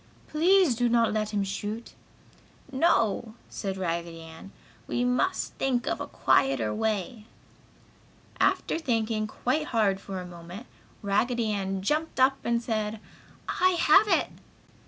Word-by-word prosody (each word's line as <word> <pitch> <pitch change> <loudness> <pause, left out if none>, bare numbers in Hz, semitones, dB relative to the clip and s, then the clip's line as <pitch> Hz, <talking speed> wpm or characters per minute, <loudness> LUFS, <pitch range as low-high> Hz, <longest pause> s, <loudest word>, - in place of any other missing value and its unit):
"Please 350 -1 +4
do 240 +1 +1
not 230 -2 +3
let 215 -1 -1
him 205 -2 0
shoot!" 205 +4 -5 0.8
"No!" 230 - +1 0.2
said 195 -2 -4
Raggedy 170 -2 -3
Ann. 165 +4 -12 0.4
"We 245 - -1
must 250 +10 0
think 255 -3 0
of - - -2
a - - -4
quieter 120 -6 +2
way!" 215 - -2 1.1
After - - +1
thinking 225 -6 -1
quite 260 +7 -1
hard 210 -7 +1
for 195 -2 -6
a 180 - -7
moment, 175 +5 -10 0.4
Raggedy 225 +3 +1
Ann 195 -2 -2
jumped 305 +6 -1
up 270 +1 +4
and 235 0 0
said: 215 -2 -2 0.5
"I 370 0 +2
have 385 +8 +6
it!" - - +2
220 Hz, 135 wpm, -27 LUFS, 195-250 Hz, 1.1 s, have